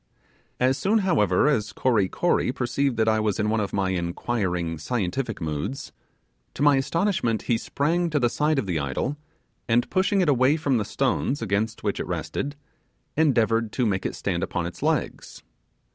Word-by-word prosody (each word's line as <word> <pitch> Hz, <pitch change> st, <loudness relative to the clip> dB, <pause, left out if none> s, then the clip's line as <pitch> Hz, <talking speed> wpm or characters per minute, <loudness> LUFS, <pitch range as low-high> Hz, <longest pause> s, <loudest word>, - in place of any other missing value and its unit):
As 130 Hz, +2 st, +2 dB
soon, 210 Hz, +4 st, +2 dB
however, 105 Hz, -, +3 dB
as 105 Hz, -9 st, +1 dB
Kory 110 Hz, -7 st, +2 dB
Kory 175 Hz, -7 st, +1 dB
perceived 130 Hz, 0 st, -1 dB
that 110 Hz, 0 st, +2 dB
I 110 Hz, 0 st, +3 dB
was 110 Hz, -2 st, 0 dB
in 105 Hz, 0 st, +1 dB
one 110 Hz, -, +1 dB
of 100 Hz, -2 st, -2 dB
my 95 Hz, -1 st, 0 dB
inquiring, 90 Hz, -2 st, -2 dB
scientific 110 Hz, +5 st, -2 dB
moods, 80 Hz, -, -4 dB, 0.6 s
to 140 Hz, -, -1 dB
my 145 Hz, -2 st, +5 dB
astonishment, 135 Hz, -, 0 dB
he 120 Hz, -, +1 dB
sprang 165 Hz, +9 st, 0 dB
to 150 Hz, -2 st, +1 dB
the 120 Hz, -, +3 dB
side 150 Hz, +5 st, +1 dB
of 135 Hz, -, 0 dB
the 90 Hz, -4 st, -1 dB
idol, 70 Hz, -, -2 dB, 0.5 s
and 120 Hz, 0 st, +2 dB
pushing 195 Hz, +2 st, +2 dB
it 180 Hz, -, +1 dB
away 135 Hz, +2 st, +4 dB
from 140 Hz, -5 st, +1 dB
the 105 Hz, -, -2 dB
stones 135 Hz, +3 st, 0 dB
against 105 Hz, +1 st, -1 dB
which -, -, -1 dB
it -, -, -3 dB
rested, 145 Hz, +1 st, -3 dB, 0.6 s
endeavoured 115 Hz, -7 st, +2 dB
to 125 Hz, -, +1 dB
make 95 Hz, -3 st, 0 dB
it -, -, -3 dB
stand -, -, -2 dB
upon -, -, -2 dB
its -, -, -7 dB
legs. -, -, -2 dB
120 Hz, 175 wpm, -25 LUFS, 105-140 Hz, 0.6 s, my